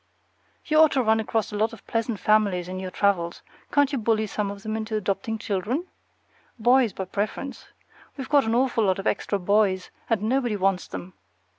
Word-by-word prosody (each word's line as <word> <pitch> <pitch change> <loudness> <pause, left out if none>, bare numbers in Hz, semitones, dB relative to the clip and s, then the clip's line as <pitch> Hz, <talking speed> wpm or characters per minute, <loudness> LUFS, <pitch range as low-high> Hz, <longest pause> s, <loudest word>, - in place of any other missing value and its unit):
You 310 0 +3
ought 315 -1 +6
to 265 -2 +2
run 220 0 +3
across 220 0 -1
a - - -5
lot 220 +3 0
of 225 - -13
pleasant 225 -1 -1
families 200 -5 +2
in 185 0 -5
your 185 -1 -4
travels; 180 -3 0 0.3
can't 285 -1 +3
you 275 - -1
bully 220 -1 +1
some 210 -1 -2
of 200 0 -8
them 215 0 -3
into 220 0 -3
adopting 215 +3 -2
children? 220 - -2 0.7
Boys 245 0 +4
by 190 - -5
preference. 210 +8 -4 0.5
We've 265 - -5
got 285 -4 +4
an 225 +1 +1
awful 240 -3 +2
lot 190 -1 +2
of 195 - -6
extra 200 - 0
boys, 195 -1 +1 0.2
and 225 -3 +1
nobody 240 -1 +1
wants 195 -2 0
them. 185 +1 -8
215 Hz, 190 wpm, -25 LUFS, 195-235 Hz, 0.7 s, ought